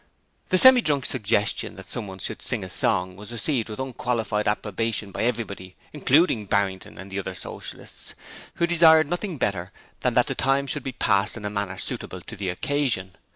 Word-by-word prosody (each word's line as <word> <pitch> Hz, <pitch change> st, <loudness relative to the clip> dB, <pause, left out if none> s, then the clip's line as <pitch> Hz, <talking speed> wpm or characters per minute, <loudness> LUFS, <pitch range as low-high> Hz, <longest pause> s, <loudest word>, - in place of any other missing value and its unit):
The 185 Hz, -, +4 dB
Semi 260 Hz, +5 st, +8 dB
drunk's 145 Hz, -, +1 dB
suggestion 105 Hz, -4 st, 0 dB
that -, -, -11 dB
someone 100 Hz, -5 st, -3 dB
should 95 Hz, -, -4 dB
sing -, -, -2 dB
a -, -, -7 dB
song 90 Hz, 0 st, +3 dB
was 105 Hz, +4 st, -9 dB
received 120 Hz, 0 st, -1 dB
with 105 Hz, -, -7 dB
unqualified 120 Hz, -5 st, -1 dB
approbation 105 Hz, 0 st, -1 dB
by -, -, -4 dB
everybody, 100 Hz, -6 st, -3 dB, 0.2 s
including 145 Hz, -, +3 dB
Barrington 95 Hz, -1 st, -1 dB
and 95 Hz, +2 st, -10 dB
the 100 Hz, -, -2 dB
other 95 Hz, -1 st, -5 dB
Socialists, -, -, -7 dB, 0.4 s
who 170 Hz, -, +2 dB
desired 160 Hz, -2 st, +6 dB
nothing 175 Hz, +1 st, -3 dB
better 95 Hz, -6 st, -1 dB, 0.3 s
than -, -, 0 dB
that -, -, +5 dB
the -, -, -2 dB
time 135 Hz, +2 st, +2 dB
should -, -, -3 dB
be 135 Hz, -, -4 dB
passed 100 Hz, -2 st, +1 dB
in 105 Hz, -, -7 dB
a 105 Hz, -, -2 dB
manner 100 Hz, -2 st, -3 dB
suitable 90 Hz, -, -3 dB
to 110 Hz, -, -9 dB
the 95 Hz, -3 st, -3 dB
occasion. 115 Hz, -3 st, -1 dB
110 Hz, 185 wpm, -25 LUFS, 100-135 Hz, 0.4 s, Semi